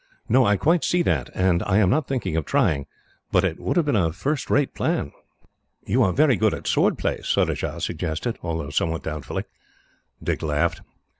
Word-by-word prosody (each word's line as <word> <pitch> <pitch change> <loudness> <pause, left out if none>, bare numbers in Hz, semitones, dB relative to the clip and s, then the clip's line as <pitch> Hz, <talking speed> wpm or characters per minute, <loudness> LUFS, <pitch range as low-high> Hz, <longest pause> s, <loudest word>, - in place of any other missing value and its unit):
"No, 130 +2 +4
I 105 0 +3
quite 165 - +2
see 175 0 +2
that, 70 - 0
and 90 -2 +2
I 95 0 +1
am 100 -4 +4
not 150 -1 +1
thinking 125 - -2
of 80 - 0
trying; 70 -1 +1 0.4
but 90 - +3
it 90 -4 -1
would - - -1
have 170 - +3
been 145 - +1
a 85 -6 +2
first 140 - -2
rate 145 -2 +2
plan." 70 - -1 0.7
"You 120 +7 +2
are 95 -6 +3
very 140 +3 +4
good - - +2
at - - -10
sword - - +2
play," - - -2
Surajah - - -1
suggested, 80 +10 -3
although 80 -4 -4
somewhat 80 +2 -1
doubtfully. 75 -5 -4 0.8
Dick - - -1
laughed. 75 -1 0
95 Hz, 190 wpm, -23 LUFS, 80-130 Hz, 0.8 s, No